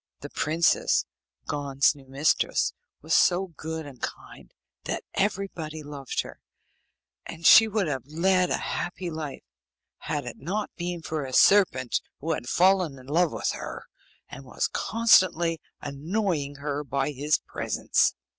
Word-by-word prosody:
The - - -8
princess, 160 +2 +2 0.4
Gon's 140 -1 +1
new 140 -3 -17
mistress, 140 +4 +1 0.3
was - - -1
so 185 +1 +4
good 160 +1 -5
and 135 -4 -12
kind - - -7 0.3
that - - -3
everybody 180 -6 -2
loved 145 -2 -4
her, - - -12 0.9
and 165 0 -9
she 225 +5 +9
would 215 -2 0
have 135 -5 -3
led 180 +4 +2
a - - +1
happy 175 0 -4
life, 155 -3 -6 0.6
had 145 -3 -3
it 120 - -7
not 200 +8 -3
been 175 -1 -4
for 155 -2 -3
a 130 -1 -7
serpent 155 - +4 0.2
who 160 +3 -2
had 120 -5 -5
fallen 180 -5 +3
in 130 - -14
love 165 +5 +2
with - - -1
her, - - -7 0.4
and - - -10
was - - -2
constantly 180 -7 +3 0.2
annoying 150 0 -2
her 145 +1 -3
by 140 +1 -1
his 145 +2 +1
presence. - - 0
155 Hz, 145 wpm, -26 LUFS, 140-180 Hz, 0.9 s, she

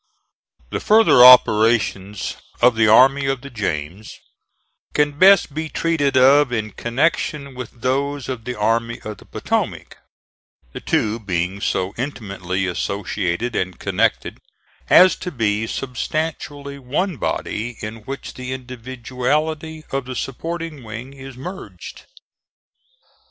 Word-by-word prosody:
The - - -2
further 215 - +6
operations 110 -5 +5 0.2
of 120 -1 +5
the 110 -1 +3
Army 135 +5 +5
of 135 -2 -1
the 140 0 -10
James 95 -2 -4 0.8
can 150 0 +3
best 195 -5 +6
be 160 +1 -4
treated 150 -6 0
of 135 +1 +5
in 110 -3 -2
connection 140 - -1
with 125 -2 -7
those 140 +1 -1
of 125 -4 -5
the 125 - -4
Army 115 +2 0
of 105 -1 -8
the - - -16
Potomac, - - -3 0.8
the - - -6
two 110 +2 0
being 95 -1 -2
so 95 0 -1
intimately 100 -8 -3
associated 95 +3 -2
and 95 -1 -2
connected - - -1 0.5
as 185 0 +7
to 180 - -5
be 110 -4 -1
substantially 140 +2 -4
one 150 +7 -2
body 115 0 -3
in 110 +2 -6
which 135 +5 -8
the 130 0 -6
individuality 130 +5 -3
of 135 -1 -2
the 130 0 -6
supporting 165 +3 -5
wing 115 +4 -8
is 135 -1 -11
merged. 180 +8 -9
125 Hz, 125 wpm, -20 LUFS, 110-140 Hz, 0.8 s, as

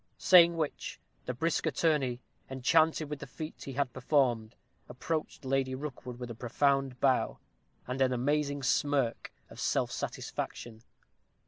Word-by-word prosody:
Saying 170 -2 +7
which, 155 -3 -3 0.3
the 125 - -1
brisk 160 +4 0
attorney, 135 -5 +1 0.3
enchanted 155 +4 +2
with 150 -1 -5
the - - -8
feat 155 +4 -8
he 135 - -6
had 135 -2 -1
performed, 125 -4 +1 0.3
approached 155 +3 -4
Lady 130 0 0
Rookwood 130 -3 -7
with 120 -1 -6
a - - -4
profound 135 +2 0
bow, 130 -2 +2 0.5
and 130 +2 -3
an 130 -1 +4
amazing 145 +2 0
smirk 135 -2 +1 0.2
of - - -11
self - - 0
satisfaction. 110 -2 -5
135 Hz, 135 wpm, -31 LUFS, 125-150 Hz, 0.5 s, Saying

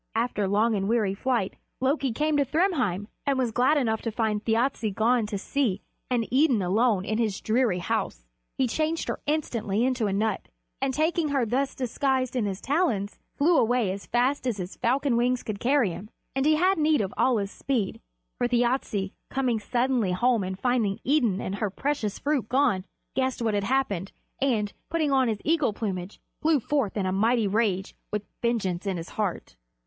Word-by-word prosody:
After 225 -3 0
long 215 +4 +2
and 195 -1 -1
weary 220 -4 +2
flight 225 -1 -1 0.2
Loki 270 0 +1
came 300 +6 0
to 285 - +4
Thrymheim, 275 - 0 0.2
and 275 -1 +2
was 250 -3 0
glad 255 +7 +3
enough 225 -5 0
to 230 - -2
find 215 -1 -1
Thjassa 230 0 +1
gone 230 0 +2
to 210 -1 -3
sea 215 -2 -1 0.3
and 240 -3 +1
Idun 260 -7 +4
alone 205 +1 +2
in 215 +1 -1
his 215 -4 0
dreary 225 -4 +1
house. - - -2 0.3
He 265 - +3
changed 315 +6 -1
her - - -2
instantly 235 -8 0
into 255 -4 +1
a - - -1
nut, 210 +1 -1 0.3
and 270 0 +1
taking 315 +3 +1
her 275 -4 +1
thus 265 +5 -1
disguised 260 0 0
in 240 -4 +1
his 195 -1 -3
talons, 265 - 0 0.2
flew 330 +5 +3
away 235 -4 +2
as 195 +1 -7
fast 255 +3 +1
as 235 -4 0
his 180 0 -6
falcon 255 0 +1
wings 245 +1 +1
could 210 -2 -4
carry 255 -6 +2
him. 195 +5 -8 0.3
And 270 +2 +2
he 310 - +5
had 365 +3 +2
need 305 -4 +3
of 195 -2 -3
all 255 -2 +3
his 200 -1 -2
speed, 240 -8 -2 0.4
for 245 - +2
Thjasse, 240 -5 0 0.2
coming 255 -4 0
suddenly 240 -3 0
home 235 +2 +2
and 185 0 -4
finding 230 -3 0
Idun 245 -9 +2
and 190 - -3
her 210 0 -1
precious 230 -1 -2
fruit 285 -6 -1
gone, 245 -8 +2 0.3
guessed 260 -1 0
what 225 -2 0
had 200 -1 0
happened, 210 -7 0 0.3
and, 220 -7 +1 0.2
putting 315 -3 0
on 265 -2 +3
his 215 -3 -2
eagle 310 -8 +2
plumage, 195 -3 -4 0.2
flew 310 -2 +3
forth 260 -5 -1
in 195 - 0
a 185 - 0
mighty 220 +3 +2
rage, 200 -2 0 0.2
with 210 0 -2 0.2
vengeance 200 -6 -1
in 190 -2 -1
his 165 +1 -6
heart. 200 - -3
235 Hz, 190 wpm, -26 LUFS, 205-265 Hz, 0.4 s, he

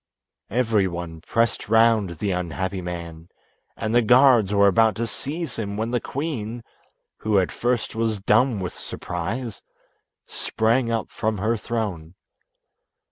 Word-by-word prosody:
Everyone 95 -8 0
pressed 115 -2 0
round 110 -6 +3
the 100 +4 -1
unhappy 90 +1 -2
man, 85 -2 -7 0.5
and 110 0 -2
the 120 - +5
guards 120 -3 +5
were 100 0 +4
about 110 +1 +4
to 115 - -1
seize 145 +8 -5
him, 100 -2 -3
when 110 +2 -2
the 120 - 0
queen, 120 -6 -4 0.6
who 110 -2 +1
at 95 -2 +2
first 120 -1 -1
was 110 -1 0
dumb 110 +4 +2
with 90 -2 -4
surprise, 110 +7 -5 0.6
sprang 115 +2 0
up 115 -1 -2
from 110 0 -1
her 110 +5 +1
throne. 100 -8 -4
110 Hz, 135 wpm, -24 LUFS, 95-115 Hz, 0.6 s, the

